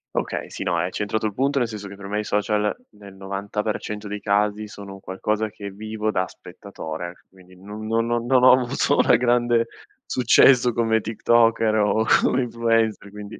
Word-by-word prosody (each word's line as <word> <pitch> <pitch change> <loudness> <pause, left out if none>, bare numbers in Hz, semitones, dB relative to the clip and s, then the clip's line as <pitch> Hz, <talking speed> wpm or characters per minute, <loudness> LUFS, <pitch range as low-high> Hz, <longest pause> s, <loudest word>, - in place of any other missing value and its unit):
Okay, - - -3
sì - - -6
no, 85 - 0
hai 85 +2 0
centrato 110 +2 -2
il 105 - -6
punto, 140 +3 +1
nel 120 - +1
senso 105 -2 -7
che 100 - -10
per 100 0 -10
me 105 +1 -3
i - - -2
social 105 0 0 0.2
nel 100 -1 -14
90% 105 +2 -4
dei 105 +1 -5
casi 105 +1 0
sono 100 -1 -10
un 95 - -11
qualcosa 105 +3 -2
che 100 -1 -8
vivo 110 +2 -4
da 95 -3 0
spettatore, 90 -2 -9
quindi 95 -1 -19
non 105 +4 -9
non 115 +1 0
non 120 0 -1
non 125 0 +3
ho 130 - +8
avuto 130 +3 0
una - - +5
grande 120 -1 +2 0.4
successo 125 0 +4
come 110 -1 +1
tiktoker 115 0 +2
o 110 +1 +2 0.2
come 130 - +2
influencer, 115 -3 0
quindi 105 +1 -9
105 Hz, 185 wpm, -23 LUFS, 100-115 Hz, 0.4 s, ho